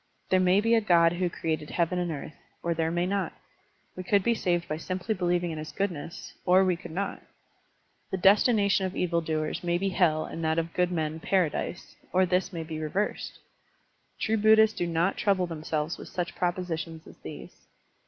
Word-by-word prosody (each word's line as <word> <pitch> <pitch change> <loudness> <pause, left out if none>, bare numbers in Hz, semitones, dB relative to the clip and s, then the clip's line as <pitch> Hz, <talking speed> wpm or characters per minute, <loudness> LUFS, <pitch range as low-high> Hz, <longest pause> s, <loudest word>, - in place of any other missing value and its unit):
There 185 - +5
may 185 +2 +4
be 230 +2 +2
a 230 - +5
god 170 -4 +4
who 180 0 0
created 160 -3 -3
heaven 175 +1 0
and 175 -1 -1
earth, 150 0 -6 0.3
or 170 - +1
there 160 0 0
may 175 +1 0
not; 195 +1 -1 0.6
we 185 - -5
could 200 +1 +2
be 235 - +3
saved 175 -5 0
by 155 - -2
simply 185 +6 -2
believing 175 -2 0
in 155 - -5
his 155 - -6
goodness, 175 -5 -4
or 185 +1 +5
we 180 -1 +2
could 170 - -10
not; 195 +5 -3 0.9
the 190 - -2
destination 200 0 +4
of 185 - -8
evil 170 -1 +1
doers 155 0 -2
may 175 0 +1
be 195 +2 0
hell 165 -5 +2
and 165 - -6
that 160 0 +1
of 165 0 -1
good 180 0 +1
men 160 -2 -2
paradise, 175 0 -1 0.2
or 185 +1 +4
this 180 +2 0
may 165 -3 -4
be 160 -1 -6
reversed: 185 +7 -2 0.8
true 220 +1 +1
Buddhists 220 0 +5
do 175 - -1
not 170 +3 +1
trouble 195 -3 +2
themselves 155 -1 -3
with - - -9
such 175 -1 -3
propositions 170 -2 -3
as - - -14
these. - - -11
175 Hz, 195 wpm, -28 LUFS, 165-190 Hz, 0.9 s, There